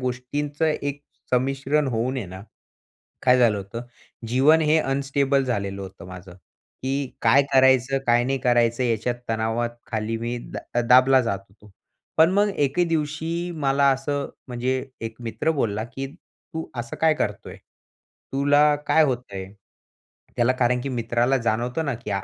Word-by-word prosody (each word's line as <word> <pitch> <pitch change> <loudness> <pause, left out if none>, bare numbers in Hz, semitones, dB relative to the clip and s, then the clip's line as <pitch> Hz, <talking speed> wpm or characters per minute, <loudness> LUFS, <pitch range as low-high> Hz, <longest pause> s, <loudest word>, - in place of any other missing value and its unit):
गोष्टींचं 140 +5 -3
एक 145 -2 -2 0.3
संमिश्रण 135 +3 +1
होऊन 120 +3 -1
आहे 115 -7 -4
ना, 95 +1 -9 0.8
काय 125 0 +5
झालं 115 -4 +4
होतं, 100 +4 -7 0.5
जीवन 140 +7 +4
हे 155 +1 +3
अनस्टेबल 140 -1 +1
झालेलं 100 -6 -2
होतं 95 -2 -10
माझं. 90 0 -10 0.5
की 135 0 -3
काय 140 +2 +5
करायचं, 130 0 +4
काय 120 0 +4
नाही 135 +1 0
करायचं, 120 0 +2
याच्यात 120 +1 0
तणावाखाली 115 0 -2
मी 120 +2 -3
अ, 120 - -9 0.2
दा 120 - +3
दाबला 130 +1 +6
जात 100 -5 -1
होतो. 105 +1 -20 0.5
पण 160 +2 +6
मग 205 +1 +3 0.2
एके 175 +6 +1
दिवशी 165 +2 -2
मला 140 +1 +3
असं 140 +1 -2 0.2
म्हणजे 130 +1 -1 0.2
एक 115 0 -5
मित्र 120 +7 -2
बोलला, 110 0 -1
की 135 +3 -6
"तू 160 -2 -10
असं 120 0 -5
काय 160 -1 +4
करतो 105 -8 -3
आहे? - - -10 0.7
तुला 145 +2 +4
काय 160 - +5
होत 125 -3 -1
आहे?" 95 -1 -5 0.9
त्याला 120 +2 +4
कारण, 125 -1 +1
की 140 - -4
मित्राला 120 +1 +1
जाणवतं 120 +5 -1
ना, 140 -3 -1
की 110 -2 -8
130 Hz, 150 wpm, -24 LUFS, 115-140 Hz, 0.9 s, दाबला